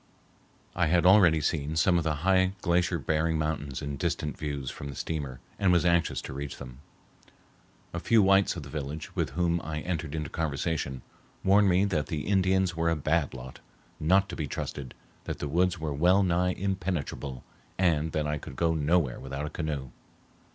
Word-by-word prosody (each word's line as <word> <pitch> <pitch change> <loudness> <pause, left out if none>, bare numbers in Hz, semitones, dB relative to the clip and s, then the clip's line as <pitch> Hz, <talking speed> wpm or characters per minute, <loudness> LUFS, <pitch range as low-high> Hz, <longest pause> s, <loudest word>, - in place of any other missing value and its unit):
I 85 -1 +2
had 85 +2 +3
already 90 -5 +6
seen 75 +1 -1
some 85 +2 +3
of - - -2
the 80 -1 0
high 95 0 +4
glacier 85 0 +2
bearing 80 +2 0
mountains 75 -3 -3
in 70 -1 -4
distant 75 +2 -2
views 70 -3 -4
from 70 - -7
the 70 - -7
steamer, 70 -5 -4 0.2
and 95 -2 +3
was 90 -1 +3
anxious 85 -1 +2
to - - -7
reach 70 0 -5
them. 65 0 -10 1.1
A 85 - -2
few 110 +4 +4
whites 95 0 +4
of 85 - -6
the 70 - -10
village, 75 +2 -6
with - - 0
whom 85 -1 +1
I 75 0 -4
entered 80 -3 -3
into 75 -2 -4
conversation, 75 -4 -2 0.4
warned 100 +1 +5
me 90 +2 +3
that 80 -7 -1
the 75 -2 -3
Indians 95 -2 +2
were 85 0 +1
a 85 - +2
bad 75 -1 0
lot, 65 0 -9 0.4
not 95 +5 +3
to - - -5
be 75 - -3
trusted, 65 -1 -5 0.3
that - - -4
the 75 - -4
woods 90 +4 +1
were 80 -2 -2
well 90 +7 +4
nigh 90 0 +1
impenetrable, 90 -9 -3 0.3
and 80 -4 +2
that 75 -1 0
I 75 0 -1
could 65 - -9
go 85 +2 +1
nowhere 80 -3 +1
without 70 +2 -5
a 75 - -6
canoe. 75 -5 -4
80 Hz, 185 wpm, -28 LUFS, 70-90 Hz, 1.1 s, already